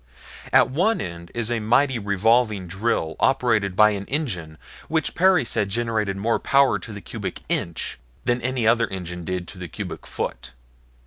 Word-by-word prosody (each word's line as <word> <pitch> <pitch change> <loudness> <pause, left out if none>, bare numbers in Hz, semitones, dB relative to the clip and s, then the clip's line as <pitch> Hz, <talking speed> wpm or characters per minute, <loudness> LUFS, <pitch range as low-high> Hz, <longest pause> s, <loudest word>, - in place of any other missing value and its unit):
At - - +5
one 190 +11 +2
end 85 -1 -6
is 120 0 -1
a 120 - +1
mighty 120 +4 +2
revolving 105 0 +2
drill 90 -3 -1
operated 115 -8 +2
by 105 +1 +6
an 100 -1 -4
engine 90 - -3 0.3
which 160 0 0
Perry 185 -6 +4
said 100 -3 0
generated 110 -2 -1
more 115 +4 +1
power 135 -7 +3
to 100 - -9
the 100 -1 -7
cubic - - -6
inch 85 -6 -2 0.3
than 120 0 +1
any 125 -2 -1
other 115 0 +4
engine 90 -2 -6
did 90 0 -3
to 95 - -11
the 90 - -5
cubic - - -7
foot. - - -5
110 Hz, 170 wpm, -23 LUFS, 95-120 Hz, 0.3 s, by